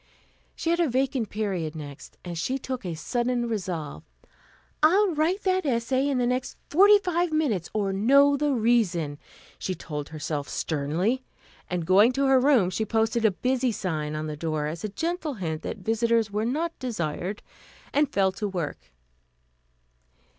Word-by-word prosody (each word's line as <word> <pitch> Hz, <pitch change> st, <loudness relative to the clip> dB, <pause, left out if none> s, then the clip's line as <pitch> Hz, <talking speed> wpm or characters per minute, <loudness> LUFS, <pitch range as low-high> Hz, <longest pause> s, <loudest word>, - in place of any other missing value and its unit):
She 330 Hz, -, -1 dB
had 340 Hz, -, +1 dB
a 335 Hz, -4 st, +3 dB
vacant 255 Hz, -3 st, 0 dB
period 185 Hz, -7 st, -2 dB
next, 145 Hz, -3 st, -9 dB
and 175 Hz, -1 st, -5 dB
she 255 Hz, +11 st, -1 dB
took 260 Hz, -2 st, -5 dB
a 175 Hz, -3 st, -4 dB
sudden 240 Hz, +7 st, -1 dB
resolve. 180 Hz, -9 st, -4 dB, 0.8 s
"I'll 370 Hz, +5 st, +4 dB
write 330 Hz, +7 st, 0 dB
that 375 Hz, -1 st, +2 dB
essay 260 Hz, +1 st, +1 dB
in 275 Hz, -, 0 dB
the 245 Hz, -, +2 dB
next 250 Hz, +1 st, -2 dB
forty 405 Hz, +6 st, +7 dB
five 355 Hz, -3 st, 0 dB
minutes, 260 Hz, -, 0 dB
or 200 Hz, -2 st, -1 dB
know 280 Hz, +8 st, +5 dB
the 290 Hz, +1 st, +1 dB
reason," 210 Hz, -, +1 dB, 0.4 s
she 185 Hz, -, -3 dB
told 150 Hz, -3 st, -6 dB
herself 150 Hz, -2 st, -4 dB
sternly, 170 Hz, -, -1 dB, 0.5 s
and 175 Hz, -2 st, -2 dB
going 205 Hz, +8 st, +5 dB
to 275 Hz, +2 st, +1 dB
her 270 Hz, -1 st, +5 dB
room 250 Hz, -9 st, +4 dB
she 205 Hz, +5 st, -1 dB
posted 225 Hz, +1 st, +1 dB
a -, -, +7 dB
"busy" 255 Hz, +5 st, 0 dB
sign 155 Hz, -7 st, -3 dB
on 155 Hz, 0 st, -3 dB
the 155 Hz, -1 st, -4 dB
door 155 Hz, -1 st, -2 dB
as 160 Hz, +2 st, -5 dB
a 215 Hz, -, -2 dB
gentle 325 Hz, -, -3 dB
hint 160 Hz, -6 st, -3 dB
that -, -, -5 dB
visitors 225 Hz, +2 st, +1 dB
were 210 Hz, +2 st, -1 dB
not 320 Hz, +7 st, -2 dB
desired, 190 Hz, -, -3 dB, 0.5 s
and 290 Hz, -1 st, +2 dB
fell 190 Hz, -1 st, +2 dB
to 205 Hz, +2 st, -3 dB
work. 175 Hz, -6 st, -5 dB
225 Hz, 165 wpm, -26 LUFS, 175-270 Hz, 0.8 s, forty